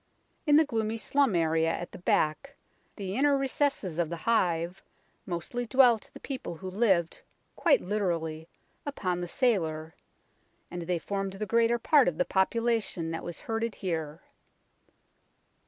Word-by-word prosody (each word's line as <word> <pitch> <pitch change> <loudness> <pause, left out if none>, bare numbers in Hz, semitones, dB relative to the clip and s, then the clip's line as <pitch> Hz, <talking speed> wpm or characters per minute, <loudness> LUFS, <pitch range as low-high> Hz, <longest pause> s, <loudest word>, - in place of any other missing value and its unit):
In 295 - +6
the 315 +1 +6
gloomy 225 -4 -1
slum 275 -2 +1
area 165 -1 +2
at 175 - -5
the - - -10
back, 180 - 0 0.4
the 195 -2 -4
inner 280 +2 +3
recesses 270 - -1
of 170 -3 +1
the 170 - -3
hive, 175 -3 0 0.5
mostly 195 +8 -3
dwelt 245 -3 +4
the - - -9
people 260 -11 -5
who 185 +3 -7
lived, 190 -5 +1 0.3
quite 325 -5 +3
literally, 170 -5 -2 0.3
upon 185 -11 -2
the 175 - -3
sailor, 160 - 0 0.8
and 175 0 -5
they 180 -1 +1
formed 195 +2 -3
the 205 +2 -4
greater 230 +3 +3
part 285 +3 +4
of 170 -3 0
the 180 - +2
population 210 -4 0
that 165 - -4
was 175 - -6
herded 225 0 -2
here. 160 -3 -4
195 Hz, 145 wpm, -29 LUFS, 170-235 Hz, 0.8 s, In